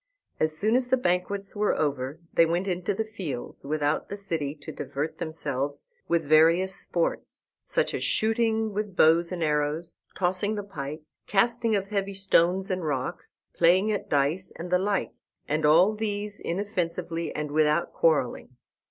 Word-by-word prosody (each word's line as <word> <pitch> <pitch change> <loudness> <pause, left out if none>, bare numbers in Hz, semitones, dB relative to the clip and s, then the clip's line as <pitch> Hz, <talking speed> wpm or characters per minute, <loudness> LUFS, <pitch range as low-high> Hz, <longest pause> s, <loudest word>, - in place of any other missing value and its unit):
As 155 0 0
soon 215 +6 +2
as 255 -1 +2
the 260 - +3
banquets 195 -1 -1
were 210 0 +1
over 140 0 -1
they 165 - +5
went 175 +4 -1
into 180 +1 -1
the 220 - -1
fields 165 - -6
without 150 0 0
the 200 - -5
city 160 -7 -3
to 145 - -9
divert 145 +3 -4
themselves 145 -3 -3 0.2
with 170 -2 +1
various 165 +5 +5
sports, 175 -3 -1 0.2
such - - +1
as - - -2
shooting 220 -1 +1
with 205 -2 -3
bows 165 +2 +4
and 175 -2 -2
arrows, 150 +2 0 0.2
tossing 190 +3 0
the 205 - -3
pike, 155 -5 -6 0.2
casting 230 +2 +2
of 195 -1 -2
heavy 200 -1 -2
stones 190 0 +2
and 185 -1 -2
rocks, 135 -4 -4 0.2
playing 185 +5 +4
at 205 - -3
dice, 145 +6 +1
and 175 +2 -7
the 180 - +4
like, 200 +1 0 0.4
and 150 +1 +1
all 175 +7 +6
these 210 -1 -3
inoffensively, 170 -3 -3
and 150 -1 -3
without 155 +2 +2
quarrelling. 130 -5 +1
175 Hz, 160 wpm, -27 LUFS, 155-200 Hz, 0.4 s, all